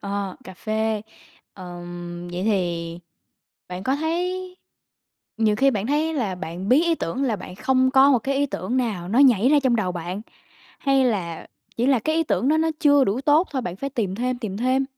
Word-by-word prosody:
ờ, 200 -1 -4
cà 190 - -10
phê. 220 +1 -1 0.5
Ờm, 175 -1 -8
vậy 180 +1 -3
thì 175 -5 -1 0.7
bạn 180 +1 -6
có 265 +6 0
thấy 360 +4 -2 0.8
nhiều 215 -2 +2
khi 270 +4 +4
bạn 210 -3 -2
thấy 310 +3 0
là 220 -10 -1
bạn 180 +1 -6
bí 265 +6 +5
ý 340 -1 +2
tưởng 260 - -3
là 225 -5 0
bạn 180 - -9
không 260 +5 +2
có 270 +1 +6
một 260 - +4
cái 270 +4 -2
ý 285 - +2
tưởng 235 -1 -3
nào 210 -9 -1
nó 225 +6 +1
nhảy 255 -4 +5
ra 295 0 +5
trong 250 -3 +3
đầu 190 -5 -1
bạn, 175 +4 -5 0.6
hay 275 -1 +2
là 185 -9 -2 0.3
chỉ 240 +2 +1
là 270 -3 +4
cái 310 +8 -1
ý 325 - +3
tưởng 270 - 0
đó 310 - +4
nó 320 +1 +2
chưa 285 -2 +5
đủ 210 +4 0
tốt 300 +5 +3
thôi, 265 -4 -2
bạn 180 -3 -5
phải 275 +7 -4
tìm 215 -8 -2
thêm, 250 +3 -2
tìm 215 -6 -5
thêm, 255 +4 +1
235 Hz, 210 wpm, -23 LUFS, 185-275 Hz, 0.8 s, có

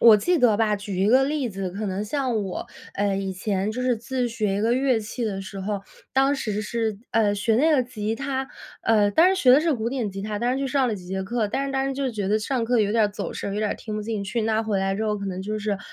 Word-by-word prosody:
我 225 -2 +9
记 350 - +1
得 240 -6 +4
吧， 215 -1 +2
举 200 -2 -5
一 195 - +3
个 260 +4 +5
例 285 -2 -1
子， 195 -3 -4
可 205 +4 -4
能 195 +1 -2
像 250 -2 -1
我， 190 - -5 0.3
呃， 200 -1 +1
以 195 -1 -2
前 195 +1 -1
就 250 - -4
是 250 -1 +1
自 250 +2 -2
学 215 -4 -1
一 - - -1
个 225 +2 +2
乐 260 -2 +2
器 220 +3 -4
的 200 -3 -2
时 195 0 -7
候， 200 +1 -2 0.3
当 270 +2 +3
时 215 -6 -2
是， 220 -1 -2
呃， 215 -2 +3
学 215 +2 +1
那 305 +7 +4
个 290 -5 +4
吉 220 -3 -3
他， 270 +1 -3 0.3
呃， 210 -2 +3
当 345 - +5
时 380 - -2
学 255 - +7
的 265 +4 +7
是 325 0 +2
古 230 -4 -1
典 240 -5 -2
吉 195 +1 -6
他， 210 +1 -3
当 240 +3 +1
时 265 - -1
去 275 - -1
上 265 0 +2
了 220 - -1
几 185 -3 -9
节 190 +1 -3
课， 215 +2 -1
但 270 +6 -1
是 275 - -3
当 270 0 0
时 275 - -1
就 270 -1 -1
觉 205 -4 -3
得 210 +2 +3
上 235 +2 -1
课 240 +1 +2
有 205 -1 +1
点 225 -1 +4
儿 - - +2
走 205 - -5
神， 200 - -4
有 210 - -1
点 215 -1 0
儿 - - -1
听 215 - -7
不 215 - -3
进 215 -1 -3
去。 220 +4 -2
那 220 0 +1
回 215 -3 0
来 195 0 0
之 215 +3 -2
后 210 -1 0
可 200 - -5
能 185 -1 -4
就 215 +3 -3
是， 205 -1 -2
220 Hz, 315 characters per minute, -24 LUFS, 205-255 Hz, 0.3 s, 我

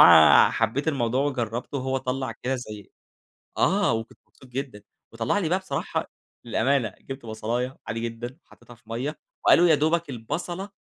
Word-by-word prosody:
آآ - - +9
حبيت 115 +7 0
الموضوع 130 -3 +1
وجرّبته 125 -1 -2
وهو 130 +1 -1
طلّع 130 -1 -2
كده 125 +3 -3
زي 105 -4 -9 0.7
آه، 200 - +3
وكنت 115 0 -4
مبسوط - - -19
جدًا 125 -5 -5 0.3
وطلّع 115 - 0
لي 175 -6 0
بقى 185 - +2
بصراحة 165 -8 -3 0.3
للأمانة 120 -1 +1
جِبت 135 -3 -8
بصلاية 120 +4 -3
عادي 115 - -3
جدًا 115 +2 -5
وحطّيتها 120 - -16
في 120 - -25
مَيّة 130 +7 -3 0.3
وقالوا 175 +1 +7
يا 160 - +7
دوبَك 160 +2 +1
البصلة 170 - -4
130 Hz, 155 wpm, -25 LUFS, 115-145 Hz, 0.7 s, آآ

